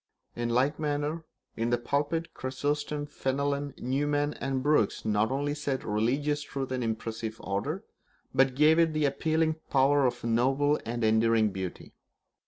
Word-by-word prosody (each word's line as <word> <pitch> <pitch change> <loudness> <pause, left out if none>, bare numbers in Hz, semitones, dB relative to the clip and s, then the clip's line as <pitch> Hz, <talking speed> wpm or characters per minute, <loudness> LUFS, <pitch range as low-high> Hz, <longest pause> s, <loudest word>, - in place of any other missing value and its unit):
In 120 0 -2
like 130 +5 +1
manner, 150 +2 -2 0.3
in 115 +1 -1
the 120 - +2
pulpit, 145 +7 -1
Chrysostom, 145 +2 -2
Fenelon, 140 0 -2
Newman, 145 +3 0
and 135 -1 -2
Brooks 145 -8 +2
not 105 0 +2
only 145 +2 -1
set 140 -3 -2
religious 135 +8 0
truth 135 -2 -5
in 130 -1 -1
impressive 110 -1 -3
order, 100 0 -3 0.5
but 135 -1 +3
gave 155 +3 +5
it 165 -2 +3
the 155 -1 +1
appealing 160 +3 +1
power 140 0 +4
of 125 - -4
a - - -2
noble 135 +6 +2
and 120 0 -2
enduring 110 0 +3
beauty. 95 -2 -6
135 Hz, 150 wpm, -29 LUFS, 120-145 Hz, 0.5 s, gave